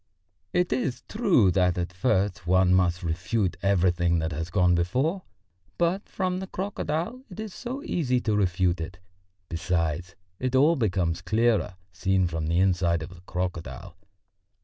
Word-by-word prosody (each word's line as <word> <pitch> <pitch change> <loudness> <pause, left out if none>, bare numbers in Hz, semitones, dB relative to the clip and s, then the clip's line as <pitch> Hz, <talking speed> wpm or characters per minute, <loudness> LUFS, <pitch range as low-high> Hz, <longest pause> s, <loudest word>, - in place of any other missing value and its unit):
It 180 -4 +1
is 130 0 -2
true 190 - +3
that 90 -1 +2
at 90 0 -2
first 95 -2 0
one 95 0 +4
must 90 -1 +2
refute 90 +4 -1
everything 90 -3 +2
that 80 0 -1
has 80 +2 -4
gone 90 0 +3
before, 130 - 0 0.6
but 175 +3 0
from 185 -1 -1
the 190 - -5
crocodile 190 - -3
it 185 - -10
is 215 -3 -5
so 260 +4 -6
easy 130 - 0
to 110 -3 0
refute 90 -3 +1
it; 85 +2 -6 0.5
besides, 85 0 -2 0.2
it 130 0 -1
all 150 +6 +5
becomes 90 - 0
clearer, 105 +1 +1 0.2
seen 95 +1 +1
from 80 -2 -2
the 85 +1 +1
inside 90 -3 +2
of 85 - -7
the 90 - -15
crocodile.... 90 0 -4
95 Hz, 150 wpm, -26 LUFS, 85-130 Hz, 0.6 s, all